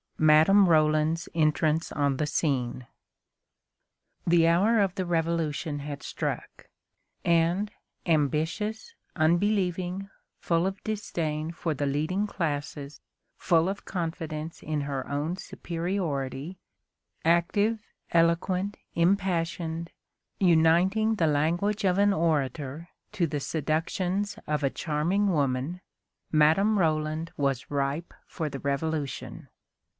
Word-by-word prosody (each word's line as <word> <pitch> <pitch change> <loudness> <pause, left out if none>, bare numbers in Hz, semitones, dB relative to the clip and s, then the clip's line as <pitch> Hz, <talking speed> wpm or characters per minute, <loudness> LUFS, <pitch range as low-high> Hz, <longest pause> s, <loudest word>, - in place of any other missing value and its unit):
MADAME 160 +6 +6
ROLAND'S 155 +1 +2
ENTRANCE 155 0 +1
ON 140 -2 0
THE 150 - 0
SCENE. 130 -5 -1 1.4
The 170 -1 +4
hour 200 +7 +4
of 195 -3 +2
the 190 -1 -2
Revolution 165 -3 -1
had 145 0 -6
struck, - - -5 0.6
and, 170 +5 +2 0.3
ambitious, 160 - 0 0.2
unbelieving, 180 +2 +1 0.3
full 170 +1 +1
of 195 0 -5
disdain 165 -7 -2
for 165 -1 -2
the 145 0 -2
leading 155 +9 0
classes, 145 -5 -4 0.3
full 165 0 +2
of 195 +1 -4
confidence 160 -3 -4
in 155 -1 -2
her 140 -2 -3
own 150 +5 -2
superiority, 170 -4 -3 0.7
active, 200 +7 +2 0.3
eloquent, 180 +4 +1 0.2
impassioned, 170 -2 0 0.5
uniting 185 +5 +4
the 165 -6 +2
language 170 +8 +1
of 185 -1 +2
an 200 0 +4
orator 155 -1 -1 0.2
to 190 -5 +1
the 145 -2 -2
seductions 165 +7 -1
of 150 -1 -1
a 135 - +3
charming 165 +9 0
woman, 145 +2 0 0.5
Madame 165 +8 +4
Roland 155 -1 0
was 135 -2 -1
ripe 140 +4 -2
for 160 -3 -3
the 140 -1 -6
Revolution. 140 0 -3
165 Hz, 105 wpm, -27 LUFS, 150-185 Hz, 1.4 s, MADAME